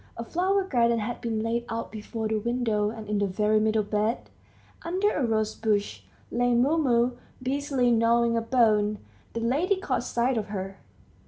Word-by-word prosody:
A 230 - -4
flower 380 +7 +1
garden 235 -9 +2
had 230 +2 -4
been 220 -2 -2
laid 230 +1 -1
out 230 0 -4
before 220 +1 -4
the 215 0 0
window, 225 -2 0
and 220 -1 -8
in 210 -1 0
the 200 - +1
very 210 +3 +2
middle 215 0 +2
bed, 210 +3 -1 0.5
under 375 +5 0
a 285 - -1
rosebush, 215 -2 0 0.3
lay 245 0 +2
Mumu 250 -3 +2 0.2
busily 265 -1 0
gnawing 230 0 +3
a 230 - +1
bone. 220 -3 +2 0.4
The 230 - -3
lady 290 - +1
caught 260 -10 -1
sight 240 0 0
of 210 - -5
her. 195 -1 -5
230 Hz, 165 wpm, -26 LUFS, 215-250 Hz, 0.5 s, gnawing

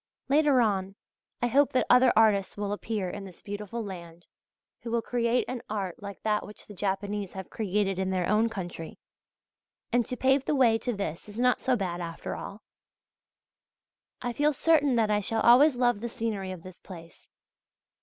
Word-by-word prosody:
Later 285 -2 +4
on, 195 -3 0 0.5
I - - +3
hope 280 +4 +3
that 255 - +2
other 250 0 +6
artists 210 -3 +3
will 205 0 -2
appear 210 -2 -3
in 200 +2 -6
this 185 -3 -12
beautiful 210 +3 -5
land, 170 -4 -9 0.5
who 235 - -7
will 230 0 0
create 240 +1 0
an 250 -2 -4
art 195 -4 -4
like 200 -1 -9
that 210 -1 +1
which 210 - -12
the 210 - -11
Japanese 200 0 -3
have 190 -1 -8
created 200 -2 -1
in 190 0 -1
their 185 -2 0
own 215 +2 +2
country; 175 -6 -7 1.0
and 245 0 +4
to 250 - -4
pave 265 +2 +2
the 300 - +1
way 235 -4 +4
to 245 +2 -2
this 200 -2 -5
is 205 - -10
not 250 0 +2
so 260 - +2
bad 180 -5 -3
after 165 -1 -5
all. 205 +2 -8 1.6
I 245 -1 -2
feel 295 +4 +2
certain 290 -2 +3
that 220 -2 +2
I 210 - +3
shall 220 +2 0
always 260 +4 +6
love 245 -3 +2
the 235 +2 -4
scenery 210 -5 -3
of 180 -3 -8
this 185 -1 -12
place. 170 -3 -13
210 Hz, 185 wpm, -28 LUFS, 190-245 Hz, 1.6 s, other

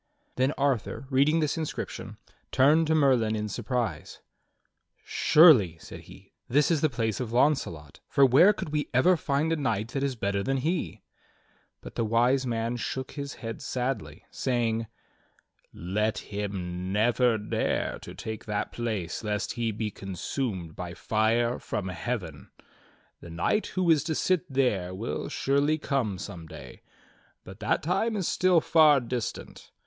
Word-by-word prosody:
Then 130 +2 +2
Arthur, 135 -3 -1
reading 145 +5 +3
this 155 +2 -1
inscription, 155 - -5 0.3
turned 155 +5 +4
to 160 - +2
Merlin 125 -7 +3
in 105 0 -2
surprise. 110 -4 -3 0.9
"Surely," 130 - +5
said - - -10
he, - - -16 0.2
"this 145 +5 +3
is 160 -3 +2
the 155 - +3
place 115 -4 -2
of 120 -3 -4
Launcelot, 120 - 0
for 140 - +4
where 135 - +6
could 205 - -5
we 150 -1 -2
ever 180 +9 +5
find 155 0 0
a - - 0
knight 115 -6 -1
that 135 +3 -3
is 140 -2 -1
better 100 -3 -1
than 135 +6 0
he.^" 165 +6 -2 0.8
But - - -10
the - - -1
Wise 120 +4 +2
Man 115 0 -1
shook 130 +2 -4
his 140 -1 -6
head 115 -2 -7
sadly, 125 -2 -4
saying: 115 -3 -1 0.8
"Let 105 +6 -1
him 95 -3 -4
never 115 +3 +2
dare 105 - -2
to - - -10
take 110 -1 -6
that 105 -1 -2
place 110 -8 -3
lest 105 -1 -2
he 120 -1 -1
be 105 0 -3
consumed 95 - -4
by 90 -1 -6
fire 115 +2 +1
from 95 -2 -4
heaven. 90 - -5 0.7
The 85 - -11
knight 85 - 0
who 185 -2 +1
is 150 -4 +3
to 160 - -1
sit 180 -2 0
there 100 -9 0
will 110 +5 -4
surely 140 +3 +1
come 130 -10 -1
some 90 -4 -8
'day, - - -11 0.6
but - - -12
that - - 0
time 195 +8 0
is 190 -5 -1
still 180 -3 +3
far 155 -3 +5
distant. 120 -2 -5
120 Hz, 155 wpm, -27 LUFS, 105-145 Hz, 0.9 s, where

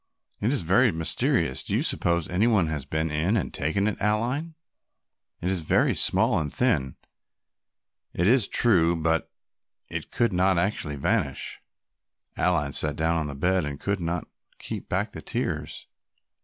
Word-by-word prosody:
"It 110 - 0
is 140 - 0
very 105 +8 +4
mysterious; 80 -5 0
do - - -3
you - - +1
suppose 85 -2 +2
any 95 +6 +1
one 105 -7 +3
has 75 -4 -4
been 80 +2 -2
in 85 +9 +1
and 95 - -3
taken 90 +8 0
it, 110 - -2
Aline; 125 +10 -1 0.9
it 90 - -1
is 95 - 0
very - - +3
small - - +3
and 75 -3 -3
thin, 75 - 0 1.2
it 90 - -1
is 115 0 +4
true, 85 -8 +4
but 80 0 0 0.6
it - - -5
could 120 -4 0
not 95 0 +2
actually 85 -5 -1
vanish." 70 - -1 0.7
Aline 80 -6 0
sat 75 -1 +2
down 80 +1 0
on 80 -2 -2
the 70 - -6
bed 90 +5 +1
and 70 -1 -5
could 100 -1 -2
not 85 0 -3 0.3
keep - - -7
back - - -1
the - - -9
tears. - - -4
85 Hz, 160 wpm, -25 LUFS, 80-105 Hz, 1.2 s, very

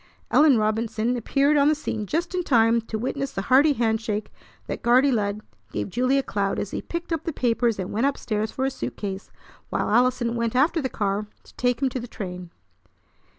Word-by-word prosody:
Ellen 295 -5 +6
Robinson 220 +2 0
appeared 280 +5 +2
on 285 0 +4
the 305 - +4
scene 220 -8 -4
just 335 - -2
in 365 - 0
time 230 -6 +3
to 225 0 -5
witness 270 +4 -3
the 195 - -3
hearty 290 +3 +6
hand 225 -3 0
shake 215 -2 -3 0.3
that - - -5
Guardy 255 +4 +4
Lud 210 -3 -1 0.3
gave - - -3
Julia 255 +4 +2
Cloud 200 -3 -1
as 205 - -3
he - - -3
picked 340 0 -4
up 325 - -2
the 330 - -2
papers 235 -4 +1
and 185 -1 -4
went 230 +6 +2
up 280 - -1
stairs 215 -1 -2
for 265 - -2
his 270 - -1
suitcase 195 -6 -5 0.4
while - - -1
Allison 240 0 +2
went 235 0 -1
after 305 +5 +3
the 260 - -2
car 205 -1 -2 0.2
to - - -19
take 245 +1 0
him 265 - +3
to 255 - -4
the 240 - -7
train. 180 -5 -7
235 Hz, 205 wpm, -24 LUFS, 215-275 Hz, 0.4 s, Ellen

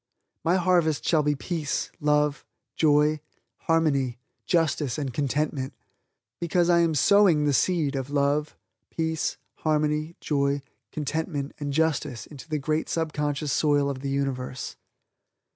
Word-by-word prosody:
My 170 +3 +3
harvest 175 -4 +2
shall 160 -3 +3
be 150 0 +1
peace, 155 0 -3
love, 150 -1 +1 0.3
joy, 150 0 +3 0.5
harmony, 140 -7 +2 0.3
justice 155 -7 +1
and 140 -4 -3
contentment, 140 0 -1 0.7
because 175 +1 +2
I 170 - +5
am 165 -2 +2
sowing 175 -1 +5
the 145 - +2
seed 155 -1 +1
of 135 0 -3
love, 145 +1 0 0.3
peace, 160 -1 -2 0.2
harmony, 155 +1 0
joy, 140 -1 0 0.3
contentment 150 -1 -3
and 145 -1 -3
justice 150 -4 0
into 150 +2 -12
the 155 - 0
great 155 +2 -1
subconscious 150 -2 -1
soil 145 -2 +2
of 135 - -6
the 140 +1 -4
universe. 130 -2 -3
150 Hz, 125 wpm, -26 LUFS, 140-160 Hz, 0.7 s, I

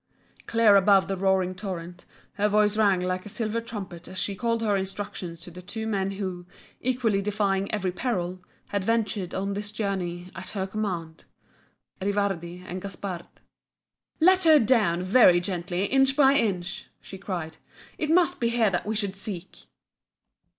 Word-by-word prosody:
Clear 225 -3 +5
above 195 0 +5
the 195 - -1
roaring 190 -1 +1
torrent 180 -2 -7 0.3
her 205 +1 +1
voice 210 0 +3
rang 200 -4 +3
like 185 0 -2
a 210 - -9
silver 225 +2 -2
trumpet 195 -7 -8
as 185 - -9
she 200 - -1
called 230 +2 -1
her 210 -2 +2
instructions 190 -3 -4
to 175 - -10
the 180 +2 -10
two 220 +4 -5
men 195 -3 0
who, 185 -3 -5 0.3
equally 240 -5 +1
defying 200 -1 0
every 195 -4 -1
peril, 185 -4 -2 0.3
had 200 -2 -1
ventured 210 -4 -1
on 195 +1 -1
this 205 +1 -3
journey 185 -4 -3
at 175 +1 -7
her 190 - 0
command, 185 -6 -4 0.8
Rivardi 190 -3 -1
and 185 0 -6
Gaspard. 190 -3 -6 0.9
"Let 370 +2 +5
her 315 -1 +8
down 215 - +2
very 185 -2 +6
gently 180 +1 -2
inch 270 +4 +3
by 275 -2 +6
inch!" 195 -9 -1
she 190 - -10
cried; 175 -5 -5 0.4
"It 305 - -1
must 355 +1 +3
be 235 -2 +1
here 230 -3 +2
that 180 +2 -2
we 220 - -1
should 200 -2 -2
seek!" 190 -2 -7
195 Hz, 160 wpm, -26 LUFS, 180-220 Hz, 0.9 s, her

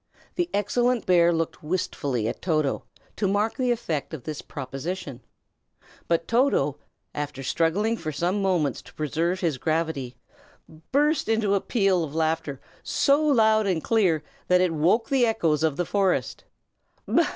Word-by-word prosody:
The 350 -1 -1
excellent 240 - +1
bear 175 -1 +5
looked 165 -1 -2
wistfully 145 -8 -2
at - - -4
Toto, 155 -6 0 0.3
to 205 - +1
mark 205 +5 0
the 255 -2 0
effect 165 - -2
of 135 - -10
this 155 +1 -5
proposition; 135 0 -6 0.9
but 165 -1 0
Toto, 235 - +2 0.4
after 145 -2 -5
struggling 175 - +1
for 155 -5 -4
some 175 +7 -1
moments 170 - 0
to - - -17
preserve 165 +4 -1
his 160 -7 0
gravity, 155 -5 -1 0.8
burst 295 -1 +2
into 220 -3 +2
a 200 - +2
peal 195 -7 +1
of 150 -1 -6
laughter, 160 -3 -1 0.2
so 280 +1 +2
loud 220 -7 +4
and 175 -5 0
clear 185 -9 +2 0.2
that 180 0 +4
it 180 -2 +2
woke 180 +9 +2
the 270 -2 +3
echoes 170 -10 +1
of 160 -3 +1
the 175 - 0
forest. 190 - 0
175 Hz, 150 wpm, -25 LUFS, 155-215 Hz, 0.9 s, bear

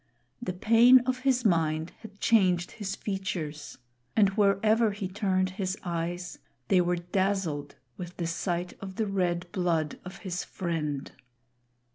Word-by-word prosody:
The 185 -6 -3
pain 230 +7 +6
of 255 +1 -1
his 255 -2 +1
mind 160 -3 +1
had 215 -2 -13
changed 185 -6 +3
his 200 -3 -4
features, 180 -8 -4 0.4
and 205 -3 +5
wherever 215 +3 +3
he 200 -2 -4
turned 185 -1 0
his 190 0 -3
eyes, 175 +1 -3 0.3
they 185 -2 +5
were 175 0 +1
dazzled 175 -4 -1 0.2
with 180 -1 -8
the 170 - -2
sight 175 +1 -2
of 190 -1 -7
the 220 - 0
red 180 -3 0
blood 165 -5 0
of 185 +1 -9
his 180 -1 -2
friend. 155 -6 -3
185 Hz, 140 wpm, -28 LUFS, 175-205 Hz, 0.4 s, pain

